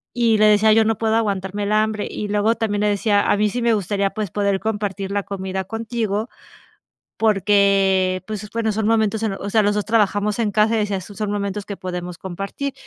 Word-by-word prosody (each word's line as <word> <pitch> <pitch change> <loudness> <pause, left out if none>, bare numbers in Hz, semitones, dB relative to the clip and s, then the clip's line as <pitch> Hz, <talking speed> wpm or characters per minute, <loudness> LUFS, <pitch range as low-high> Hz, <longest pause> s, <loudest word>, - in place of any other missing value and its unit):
Y 230 -2 +3
le 215 - +4
decía: 215 +1 +5
"Yo 220 0 +5
no 225 -1 +1
puedo 220 +1 +1
aguantarme 200 -2 -1
el 205 - -2
hambre", 215 0 +1
y 210 - -4
luego 210 +2 +1
también 210 -2 -1
le 210 - +2
decía: 205 0 +1
"A - - +3
mí 210 0 +2
sí 245 +3 -3
me 235 -1 +3
gustaría, 200 0 0
pues, 210 -3 -4
poder 200 -2 0
compartir 205 -3 -3
la 200 -1 -1
comida 190 -1 -4
contigo", 225 +1 -3 0.9
porque, 195 -3 +2
pues 210 -1 -6
bueno, 225 -1 -1
son 215 0 -1
momentos 220 -1 +1
en 215 - 0
los 195 - -6
o 200 - -4
sea, 220 +1 +3
los 205 0 +1
2 210 - -1
trabajamos 210 -1 +1
en 215 -3 +1
casa, 215 +2 +2
y 220 - +1
decía: 205 -2 -1
"Esos 195 +2 -10
son 210 -2 -2
momentos 200 0 -3
que 200 - -6
podemos 180 -1 -6
compartir". 195 +9 -5
205 Hz, 220 wpm, -21 LUFS, 200-220 Hz, 0.9 s, decía